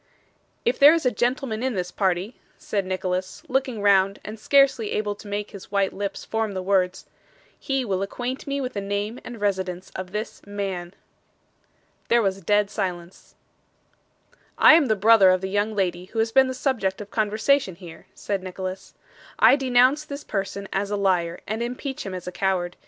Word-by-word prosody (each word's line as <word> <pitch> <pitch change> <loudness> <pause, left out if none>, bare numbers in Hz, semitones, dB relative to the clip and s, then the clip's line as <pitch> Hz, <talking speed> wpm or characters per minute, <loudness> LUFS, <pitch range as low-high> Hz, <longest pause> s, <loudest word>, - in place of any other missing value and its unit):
'If 240 - +1
there 290 +3 +8
is 330 - -2
a 250 - +3
gentleman 240 0 -1
in 260 -2 -1
this 180 -1 -3
party,' 190 +4 -1 0.2
said 200 -3 -3
Nicholas, 185 0 -3
looking 255 -5 -1
round 195 -1 +4
and 215 +1 -7
scarcely 270 -4 +3
able 210 -1 -1
to 205 - -13
make 205 0 -4
his 200 - -11
white 200 -1 +1
lips 200 0 -4
form 220 -2 -2
the 185 -1 -4
words, 190 -1 +1 0.5
'he 270 -2 -1
will 190 -3 -1
acquaint 245 +7 -4
me 280 0 -1
with 255 -2 -4
the 200 - -3
name 205 +4 -3
and 240 -2 -8
residence 190 -3 -2
of 185 -1 -6
this 215 +3 -5
man.' 195 -3 -4 1.1
There 235 -1 +3
was 195 -1 +1
a - - -17
dead 205 0 +2
silence. 180 -3 -5 1.2
'I - - +8
am 320 -2 +6
the 220 - +2
brother 210 -1 +6
of 185 0 +3
the 190 - -3
young 205 +2 0
lady 180 -3 -1
who 220 - -11
has 225 0 +1
been 265 +2 +5
the 260 - -4
subject 220 -8 -1
of 205 -1 -9
conversation 215 0 +1
here,' 170 -2 -12
said 200 -2 -3
Nicholas. 185 0 -7 0.4
'I 230 +4 +7
denounce 260 +2 +3
this 290 -1 -7
person 200 -1 -4
as 200 +1 -1
a 205 - -1
liar, 180 -3 0
and 220 +2 -3
impeach 250 0 -4
him 190 - -5
as 180 - -7
a 180 - -5
coward. 180 -2 -1
205 Hz, 185 wpm, -24 LUFS, 190-240 Hz, 1.2 s, there